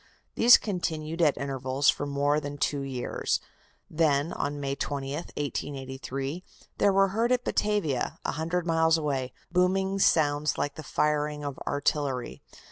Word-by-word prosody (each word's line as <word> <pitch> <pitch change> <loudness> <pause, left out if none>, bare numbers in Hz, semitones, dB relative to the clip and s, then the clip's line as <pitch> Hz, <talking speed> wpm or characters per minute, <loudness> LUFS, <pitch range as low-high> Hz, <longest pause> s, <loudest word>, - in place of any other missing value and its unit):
These 240 +1 +8
continued 165 -4 -3
at 150 -4 +4
intervals 135 0 +1
for 145 - -4
more 145 +1 +1
that 145 -1 -6
two 145 0 0
years. 130 -3 -2 0.5
Then, 155 -1 +1
on 145 0 -3
May 140 -1 -2
20, 140 -1 -3
1883, 135 0 -4 0.4
there 200 - +4
were 195 0 +4
heard 225 +5 0
at 250 -1 +2
Batavia, 200 -12 0
a - - 0
hundred 165 +3 -2
miles 165 -1 +3
away, 135 -5 -2 0.2
"booming 190 +2 +1
sounds 150 -4 +3
like 145 - -1
the 155 - -8
firing 150 0 0
of 140 -2 -5
artillery." 140 - -1
150 Hz, 140 wpm, -28 LUFS, 140-165 Hz, 0.5 s, These